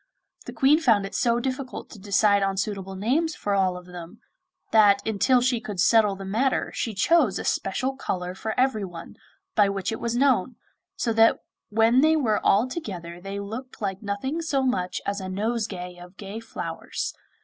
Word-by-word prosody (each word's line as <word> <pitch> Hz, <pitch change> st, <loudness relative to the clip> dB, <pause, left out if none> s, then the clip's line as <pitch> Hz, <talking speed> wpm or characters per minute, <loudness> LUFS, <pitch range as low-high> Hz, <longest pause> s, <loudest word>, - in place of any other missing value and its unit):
The -, -, -5 dB
Queen 285 Hz, +4 st, +4 dB
found 225 Hz, -10 st, +3 dB
it 195 Hz, -, -8 dB
so 235 Hz, 0 st, +2 dB
difficult 260 Hz, +1 st, -5 dB
to 215 Hz, -, -11 dB
decide 200 Hz, 0 st, +3 dB
on 195 Hz, 0 st, 0 dB
suitable 195 Hz, -1 st, -3 dB
names 285 Hz, -, 0 dB
for 205 Hz, -, -2 dB
all 190 Hz, -2 st, +1 dB
of 180 Hz, -, -11 dB
them, 180 Hz, +3 st, -10 dB, 0.5 s
that 205 Hz, -2 st, +5 dB
until 245 Hz, +4 st, +3 dB
she 245 Hz, -2 st, +1 dB
could 205 Hz, -4 st, -6 dB
settle 210 Hz, 0 st, +4 dB
the 195 Hz, 0 st, -8 dB
matter 235 Hz, +7 st, 0 dB
she 225 Hz, -3 st, -3 dB
chose 265 Hz, -, +3 dB
a -, -, -4 dB
special 255 Hz, +8 st, -1 dB
colour 180 Hz, -8 st, -3 dB
for 220 Hz, +4 st, -4 dB
everyone, 205 Hz, -10 st, -1 dB, 0.4 s
by 205 Hz, -2 st, +4 dB
which 195 Hz, 0 st, -2 dB
it 225 Hz, -, -4 dB
was 235 Hz, 0 st, -2 dB
known, 255 Hz, -3 st, +2 dB, 0.4 s
so 240 Hz, -, -1 dB
that 225 Hz, 0 st, +5 dB, 0.3 s
when 225 Hz, +4 st, +4 dB
they 315 Hz, +2 st, +4 dB
were 230 Hz, -9 st, +1 dB
all 210 Hz, +6 st, +4 dB
together 175 Hz, -, -6 dB
they 195 Hz, +1 st, -5 dB
looked 225 Hz, +6 st, -7 dB
like 195 Hz, -2 st, -3 dB
nothing 225 Hz, +10 st, -3 dB
so 285 Hz, -5 st, 0 dB
much 185 Hz, -9 st, -1 dB
as 200 Hz, 0 st, -2 dB
a 190 Hz, -, -5 dB
nosegay 195 Hz, -3 st, -3 dB
of 180 Hz, +2 st, -13 dB
gay 205 Hz, +2 st, -7 dB
flowers. 230 Hz, -, -5 dB
210 Hz, 180 wpm, -25 LUFS, 195-250 Hz, 0.5 s, that